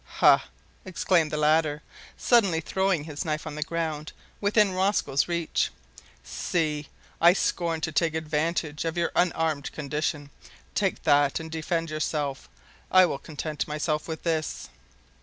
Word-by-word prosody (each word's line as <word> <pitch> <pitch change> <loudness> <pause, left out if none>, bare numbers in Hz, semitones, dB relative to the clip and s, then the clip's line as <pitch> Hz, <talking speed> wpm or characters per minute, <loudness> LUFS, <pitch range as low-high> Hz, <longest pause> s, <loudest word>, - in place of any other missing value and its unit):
"Ha!" - - +5 0.4
exclaimed 180 -3 +1
the 150 - -3
latter, 150 0 +2 0.3
suddenly 200 -9 +3
throwing 190 0 0
his 150 0 -5
knife 155 -2 -2
on 155 - -5
the 150 - -6
ground 155 -1 -3 0.3
within 205 0 +3
Rosco's 185 -7 +1
reach, 170 -2 0 0.5
"see, 155 -4 -2 0.3
I 170 +1 +8
scorn 170 -4 -1
to 160 - -1
take 160 +1 +1
advantage 155 0 -1
of 165 +1 -3
your 170 - +1
unarmed 160 -5 +1
condition. 150 0 -3 0.4
Take 195 -3 0
that 145 -2 +3
and 160 0 -8
defend 165 0 -2
yourself. 150 - -2 0.4
I 185 0 +7
will 140 -5 -3
content 155 0 -4
myself 150 0 -2
with 160 -1 -5
this." 160 -2 -2
160 Hz, 140 wpm, -26 LUFS, 150-170 Hz, 0.5 s, I